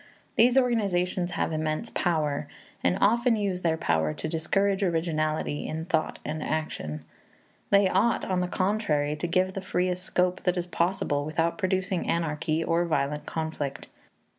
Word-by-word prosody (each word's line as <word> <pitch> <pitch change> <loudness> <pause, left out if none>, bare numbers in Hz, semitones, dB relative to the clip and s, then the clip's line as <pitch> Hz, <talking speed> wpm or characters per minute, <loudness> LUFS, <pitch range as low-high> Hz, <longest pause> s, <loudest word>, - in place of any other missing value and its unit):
These 245 +3 +5
organizations 185 -7 +1
have - - -1
immense 155 +8 -2
power, 155 -5 0 0.4
and 90 - +2
often 235 +2 +4
use 195 -4 -1
their 165 -2 +1
power 80 - +1
to - - -4
discourage 195 +5 +1
originality 155 -4 0
in 160 +1 -4
thought 165 -3 0
and 155 +1 -3
action. 80 - -3 0.6
They 200 -1 +5
ought, 200 +6 +2
on 185 -1 0
the 180 - 0
contrary, 180 -7 0
to 150 +3 -3
give 185 +2 +1
the 195 - -4
freest 180 -1 -1
scope 180 0 0
that 180 0 +1
is 175 - -1
possible 170 -4 0
without 165 +5 -1
producing 190 -1 0
anarchy 160 -1 0
or 165 +1 +2
violent 150 -2 -1
conflict. 160 -4 -4
175 Hz, 150 wpm, -27 LUFS, 155-190 Hz, 0.6 s, These